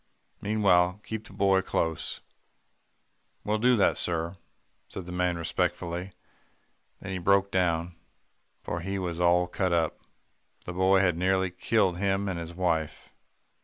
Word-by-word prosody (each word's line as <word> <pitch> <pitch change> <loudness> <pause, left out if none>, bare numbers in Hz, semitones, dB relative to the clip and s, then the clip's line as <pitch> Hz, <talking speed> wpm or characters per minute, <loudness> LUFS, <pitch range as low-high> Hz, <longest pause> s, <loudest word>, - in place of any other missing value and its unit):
Meanwhile, 100 -3 +3
keep 110 0 -6
the - - -14
boy 95 -1 +3
close.' 80 -3 -2 1.2
"'That - - -15
we'll 105 +1 +1
do, 120 -3 +4
sir,' 85 +1 -2 0.5
said 95 - -8
the 90 - -8
man 90 -1 0
respectfully, 85 +2 -2 0.9
then 100 - -6
he 95 - -3
broke 100 +2 +3
down, 85 -2 0 0.7
for 85 - -3
he 95 +3 -3
was 90 -3 -3
all 90 0 +4
cut 90 +1 -1
up. 85 -2 0 0.7
The 90 - -5
boy 95 +1 +4
had 90 -3 +1
nearly 95 0 +1
killed 95 -1 +1
him 100 0 0
and 90 -3 -2
his 85 0 -7
wife. 85 -4 -2
90 Hz, 140 wpm, -28 LUFS, 85-95 Hz, 1.2 s, do